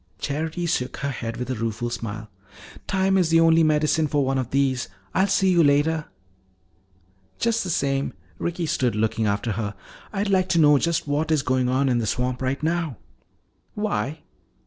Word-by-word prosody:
Charity 160 +4 -3
shook 130 -7 -1
her 140 0 -2
head 115 -2 -5
with 125 +1 -4
a - - -1
rueful 115 +1 -3
smile. 110 -2 -5 0.6
"Time 190 0 +2
is 175 -3 +2
the 165 0 +5
only 165 0 +5
medicine 155 0 +2
for 145 -1 +1
one 135 0 0
of 125 -2 -3
these. 130 -4 +1 0.3
I'll 190 +1 +3
see 195 -1 +3
you 170 -2 +5
later." 150 +2 +2 1.3
"Just 230 -1 +1
the 185 - -4
same," 140 -3 0 0.3
Ricky 170 0 -2
stood 125 -7 0
looking 110 0 0
after 100 +3 -1
her, 105 -1 -3 0.4
"I'd 205 0 -1
like 185 -1 +2
to 170 -2 +3
know 150 -2 +6
just 170 -1 0
what 145 +3 0
is 150 -4 +2
going 130 -2 +1
on 135 +2 +2
in 125 -2 +2
the 115 - -2
swamp 125 +2 -1
right 130 +3 -2
now." 165 -6 -1 0.8
"Why?" 155 - -2
145 Hz, 180 wpm, -24 LUFS, 125-165 Hz, 1.3 s, know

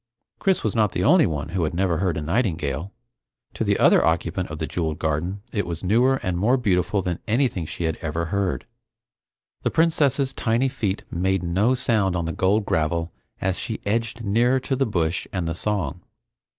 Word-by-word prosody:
Chris 190 -2 +1
was 110 - -1
not 105 -4 +2
the 90 - -1
only 160 - +5
one 75 -2 -3
who 90 0 -1
had 80 +1 -2
never 90 -2 +1
heard 90 -3 0
a 75 - -3
nightingale. 80 - -1 0.6
To - - -2
the - - +2
other - - +5
occupant 85 +2 0
of 75 - -6
the 80 - -2
jeweled 80 -2 -2
garden, 85 +5 -2
it 100 - 0
was 85 0 -5
newer 120 +8 +3
and 90 -1 -1
more 120 +7 +3
beautiful 100 -4 +1
than 90 -2 -2
anything 110 - +1
she 85 - -5
had 80 -1 -1
ever 80 +1 -3
heard. 100 -2 -1 1.0
The - - +1
Princess's 145 -5 +2
tiny 120 +3 +1
feet 105 -5 -2
made 95 +1 0
no 100 +9 +2
sound 110 -7 +1
on 85 -2 -1
the 85 - -2
gold 100 +5 +2
gravel 85 +1 0 0.3
as 95 0 -1
she 120 -2 -4
edged 115 +2 -1
nearer 120 +5 +3
to 135 - -1
the 135 0 +1
bush 85 -4 -1
and 90 -3 -2
the 80 - -1
song. 90 -4 -2
95 Hz, 190 wpm, -23 LUFS, 85-115 Hz, 1.0 s, only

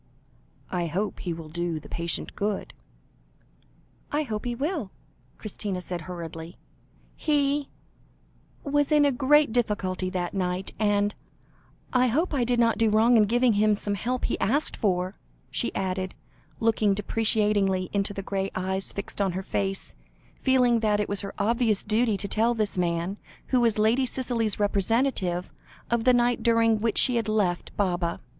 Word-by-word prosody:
"I 175 -2 -1
hope 195 +6 -2
he 175 - -3
will 165 -1 -6
do 170 0 -2
the - - -13
patient 170 0 -3
good." 205 0 -2 1.4
"I 295 +1 +1
hope 215 -5 -4
he 240 -1 -2
will," 285 - -2 0.5
Christina 205 -3 -3
said 175 -1 -5
hurriedly; 165 0 -7 0.6
"he 290 -2 +1 0.9
was 290 0 +1
in 300 -1 +5
a 285 - +4
great 285 +1 +4
difficulty 200 -6 -1
that 180 -2 -3
night, 185 -1 -2
and 205 -1 +2 0.8
I 255 0 +4
hope 310 +9 0
I 265 -4 +2
did 240 0 +1
not 230 -1 +3
do 225 -1 +4
wrong 225 +3 +4
in 215 -2 +6
giving 240 +2 +3
him 210 +1 +3
some 205 0 -2
help 245 +5 -2
he - - -2
asked 280 +8 +1
for?" 185 -2 -1 0.3
she - - -1
added, 185 0 -2 0.4
looking 220 -3 +2
deprecatingly 205 -3 +1
into 200 0 0
the 195 -1 -5
grey 195 0 -2
eyes 190 +1 -1
fixed 200 +1 -5
on 190 -2 +1
her 190 +2 -3
face, 195 0 -2 0.5
feeling 250 -3 +4
that 210 -2 +1
it 210 - -1
was 200 0 0
her 200 -1 -7
obvious 220 0 +1
duty 220 0 +1
to 195 - -3
tell 230 +4 +1
this 215 -2 -1
man, 175 +2 -1 0.3
who 255 - +3
was 230 -3 +2
Lady 230 +5 +3
Cicely's 235 -5 -1
representative, 200 -3 0 0.4
of 235 -1 +1
the 255 - +6
night 240 -1 +2
during 230 -1 +3
which 225 0 0
she 250 -2 +5
had 225 -2 -1
left 200 -5 -1
Baba. 175 -4 0
210 Hz, 160 wpm, -26 LUFS, 190-240 Hz, 1.4 s, in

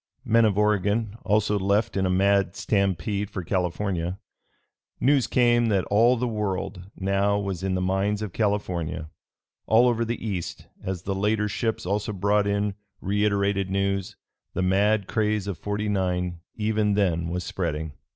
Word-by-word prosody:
Men 115 -1 +4
of 105 -2 +1
Oregon 105 +1 +1
also 105 0 +2
left 100 +4 +1
in 95 -1 +1
a - - 0
mad 95 0 +2
stampede 100 0 0
for 95 - -5
California. 90 0 -1 0.8
News 135 -1 +3
came 120 -1 +3
that 100 -4 +2
all 115 +4 +5
the 125 +2 -1
World 100 -4 -3
now 100 +1 +1
was 100 -3 -3
in 95 -1 -1
the 90 - -1
mines 100 +3 0
of 100 -5 -5
California. 90 -6 -1 0.6
All 115 +3 +5
over 115 -1 +2
the 115 +1 -2
East, 90 -5 -4 0.2
as 95 -2 -4
the 100 - -2
later 105 +2 +1
ships 110 0 -2
also 105 +3 -1
brought 100 +1 +2
in 100 0 0 0.3
reiterated 100 -1 +1
news, 100 0 -1 0.4
the 95 - 0
mad 100 +2 +2
craze 105 -2 0
of 100 -4 -4
'49 95 -4 -1 0.2
even 105 -1 +1
then 85 -5 +1
was 90 +2 -3
spreading. 80 -4 -3
100 Hz, 150 wpm, -25 LUFS, 95-105 Hz, 0.8 s, all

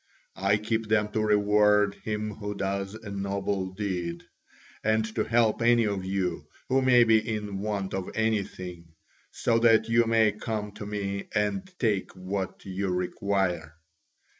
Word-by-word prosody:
I 100 +2 +3
keep 110 +1 -2
them 105 -1 +2
to 110 +1 -1
reward 105 -1 +4
him 105 0 -4
who 105 0 -5
does 100 +1 -2
a 110 -2 -9
noble 100 -1 -2
deed, 90 -3 -4 0.6
and 110 0 +2
to - - 0
help 115 -1 +2
any 120 0 +4
of 100 -2 -2
you 95 -5 -2 0.2
who 135 +1 +3
may 125 -2 +6
be 110 -1 +5
in 105 -3 -4
want 100 -2 -3
of 95 -1 -3
anything, 95 -6 -2 0.3
so 115 0 +1
that 115 -1 +4
you 115 0 +4
may 110 -1 +4
come 105 0 -4
to 105 0 -8
me 100 -1 -3
and 185 - -1
take 105 -6 0
what 95 0 -4
ou 95 +1 -3
require." 90 -2 -1
105 Hz, 150 wpm, -27 LUFS, 95-110 Hz, 0.6 s, may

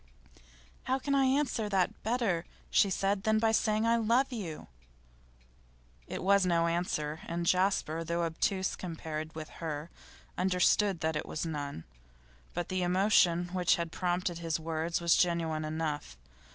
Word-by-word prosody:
'How 260 - +1
can 280 +1 -2
I 275 -1 +4
answer 260 -5 +1
that 190 -3 0
better,' 220 -7 0 0.3
she 200 - +4
said, 195 +1 0
'than 220 +1 +2
by 220 0 +3
saying 215 0 +2
I 230 0 +3
love 235 +4 +2
you?' 180 -9 -5 1.4
It - - -5
was 200 +1 +4
no 170 -2 +2
answer, 165 -3 -1
and 170 0 -2
Jasper, 180 -3 +1
though 170 +1 -1
obtuse 185 +3 0
compared 160 -2 -6
with 155 -1 -6
her, 155 0 -4 0.5
understood 185 0 +2
that 160 -1 0
it 150 - -3
was 155 - -3
none. 145 - -4 0.7
But 175 0 -3
the 185 -1 -1
emotion 180 -1 +3
which 180 -1 +3
had 170 -1 -3
prompted 180 0 -1
his 165 -1 -2
words 165 +1 -2
was 170 -1 +4
genuine 165 -3 +1
enough. 155 - -3
175 Hz, 150 wpm, -31 LUFS, 160-200 Hz, 1.4 s, I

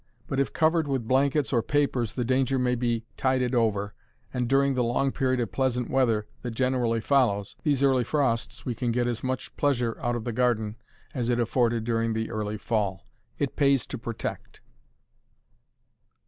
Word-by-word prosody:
But 135 - -2
if 140 - +1
covered 160 -1 +2
with 130 -5 -2
blankets 140 +3 +2
or 120 - +3
papers 130 -4 0
the 125 - -2
danger 130 +1 +1
may 125 -1 +1
be 120 -2 -1
tided 130 -1 +1
over, 105 -4 +1 0.4
and 125 -1 -1
during 135 +2 +3
the 125 -1 +1
long 125 +3 +1
period 130 -1 0
of 115 -6 -2
pleasant 125 +2 0
weather 115 -5 +2 0.2
that 120 -2 -5
generally 125 -2 +1
follows 110 -5 +1
these 140 -3 +1
early 130 -2 +4
frosts 125 -5 -1
we 125 - -1
can 120 0 -1
get 120 +1 +1
as 120 -2 -2
much 130 0 -3
pleasure 125 -5 +1
out 120 -1 0
of 120 - -3
the 120 - -3
garden 110 -3 +1 0.4
as 125 -3 -1
it 120 0 +2
afforded 120 -1 +1
during 115 0 0
the 110 0 -2
early 105 -1 -3
fall. 100 -3 -1 0.3
It 140 - -2
pays 140 -4 +3
to - - -6
protect. 115 -1 -6
125 Hz, 175 wpm, -27 LUFS, 115-135 Hz, 0.4 s, early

